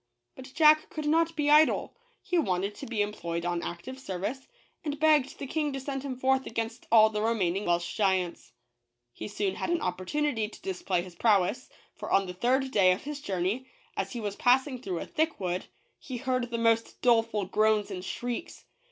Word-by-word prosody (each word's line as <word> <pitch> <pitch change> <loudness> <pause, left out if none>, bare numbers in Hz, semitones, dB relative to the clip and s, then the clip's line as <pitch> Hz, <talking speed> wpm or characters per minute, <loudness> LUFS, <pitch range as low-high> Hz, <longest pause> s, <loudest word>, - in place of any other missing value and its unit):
But 260 +1 -11
Jack 310 -1 +6
could 305 -1 -5
not 330 +2 +2
be 295 -1 +1
idle. 305 +1 +4 0.3
He 360 -3 +1
wanted 195 - 0
to - - -9
be 220 -3 0
employed 170 -5 -4
on 175 -1 -1
active 175 +10 -6
service, 210 +4 -4 0.4
and 295 -2 -3
begged 305 -3 +3
the - - -5
King 300 +2 -1
to 270 - -3
send 270 0 -4
him 270 -2 -4
forth 265 +1 +1
against 230 +1 -4
all 220 -1 +7
the 210 -1 -2
remaining 205 -4 0
Welsh 175 0 0
giants. 185 - 0 0.6
H - - -24
e - - -3
soon 200 -2 -2
had - - -3
an 340 -1 +1
opportunity 220 +6 -1
to - - -14
display 185 -1 -1
his 180 -1 -11
prowess; 200 +1 +2 0.2
for - - -7
on 195 - +3
the 180 - -6
third 260 +7 +1
day 190 -5 +5
of 185 - -6
his 290 0 -6
journey, 195 +4 -2 0.3
as - - -3
he 240 - -4
was 205 -2 -3
passing 255 +1 +2
through 185 -8 -3
a - - -4
thick 320 -1 -1
wood, 180 -1 -2 0.3
he 255 - -6
heard 255 -1 -1
the 235 - -2
most 230 0 +1
doleful 225 -4 +3
groans 215 +1 +2
and 180 -1 -5
shrieks. 245 - -5
230 Hz, 195 wpm, -28 LUFS, 190-270 Hz, 0.6 s, all